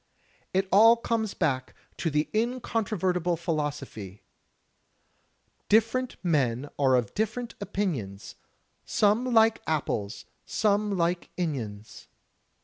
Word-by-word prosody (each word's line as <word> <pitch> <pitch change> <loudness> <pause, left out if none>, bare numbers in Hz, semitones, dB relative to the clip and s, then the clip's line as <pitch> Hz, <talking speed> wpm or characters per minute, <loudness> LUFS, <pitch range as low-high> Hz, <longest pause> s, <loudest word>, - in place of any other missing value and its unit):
It 190 +1 +1
all 225 +4 +7
comes 230 -3 -2
back 130 -6 -1 0.2
to 165 - -1
the 150 0 0
incontrovertible 215 -7 0
philosophy: 145 - -4 1.5
"Different 230 +4 +2
men 145 -5 +1
are 135 -2 +4
of 120 -4 0
different 225 +3 -2
opinions, 135 - -3 0.5
Some 215 +4 +2
like 225 -1 +4
apples, 115 -9 -2 0.2
some 205 -1 +1
like 175 +1 0
inions." 115 - -4
180 Hz, 95 wpm, -27 LUFS, 140-220 Hz, 1.5 s, all